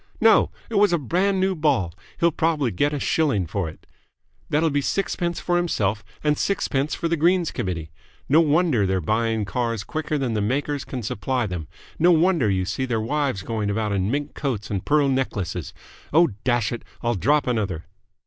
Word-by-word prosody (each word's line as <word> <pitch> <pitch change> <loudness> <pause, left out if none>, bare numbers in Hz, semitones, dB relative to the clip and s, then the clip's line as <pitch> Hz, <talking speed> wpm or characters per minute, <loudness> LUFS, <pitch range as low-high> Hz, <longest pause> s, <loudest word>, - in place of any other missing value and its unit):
No, 225 -1 +5 0.2
it 220 -3 +1
was 205 -2 +5
a 170 - +3
brand 185 - +1
new 190 0 +2
ball. 140 - +1 0.3
He'll 170 0 +4
probably 150 -6 +1
get 145 +11 +1
a 145 - -2
shilling 135 - +1
for 85 0 -2
it. 80 - -15 0.6
That'll 155 +2 +2
be 145 0 +1
sixpence 175 +1 -1
for 175 -1 0
himself 110 - 0 0.2
and 150 -1 +2
sixpence 150 -7 0
for 170 - -2
the 170 - +1
Greens 170 +2 +2
Committee. 85 -9 -4 0.4
No 155 +4 +5
wonder 150 - +2
they're 95 0 +1
buying 110 +4 0
cars 115 +1 -2
quicker 155 +3 -2
than 130 -5 -1
the 105 - 0
makers 140 +6 -1
can 125 -3 -5
supply 120 +5 -1
them. 90 -6 -5 0.3
No 175 - +5
wonder 170 - +4
you 95 -1 +1
see 105 +8 -2
their 120 -3 -1
wives 135 -3 -1
going 110 -2 -2
about 105 0 -1
in 100 0 0
mink 145 +3 -2
coats 115 -8 -3
and 95 -3 -2
pearl 145 -1 +3
necklaces. 100 - -2 0.4
Oh, 170 +3 +5
dash 120 -3 +1
it! 120 - -4 0.2
I'll 120 0 +1
drop 145 +8 +2
another!" 105 -9 -1
130 Hz, 185 wpm, -23 LUFS, 105-155 Hz, 0.6 s, No